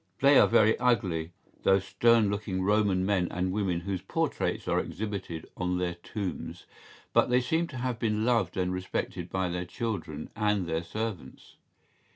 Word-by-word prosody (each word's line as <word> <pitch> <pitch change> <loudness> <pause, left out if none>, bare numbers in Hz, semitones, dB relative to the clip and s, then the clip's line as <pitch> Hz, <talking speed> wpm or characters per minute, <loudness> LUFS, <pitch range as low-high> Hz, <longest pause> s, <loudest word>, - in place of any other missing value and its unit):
¬Ý - - -26
They 140 +1 +7
are - - +6
very 110 -1 +5
ugly, 95 -10 +1 0.3
those 95 0 +3
stern 115 -1 +4
looking 100 -2 -2
Roman 100 -2 +2
men 95 -3 +1
and 90 +1 -1
women 95 -4 0
whose 95 0 -3
portraits - - -2
are - - +2
exhibited 95 -5 -5
on 90 0 -1
their 90 -1 -1
tombs, 90 +1 -6 0.5
but - - +4
they 125 0 +4
seem 160 +7 0
to 130 - -8
have 125 -2 -2
been 110 -1 0
loved 115 -8 +1
and 90 0 0
respected 90 -1 -3
by 95 0 -1
their 90 +1 -2
children 90 -8 -4
and 105 -3 +1
their 80 0 -1
servants. 100 -6 -6
95 Hz, 170 wpm, -29 LUFS, 90-110 Hz, 0.5 s, They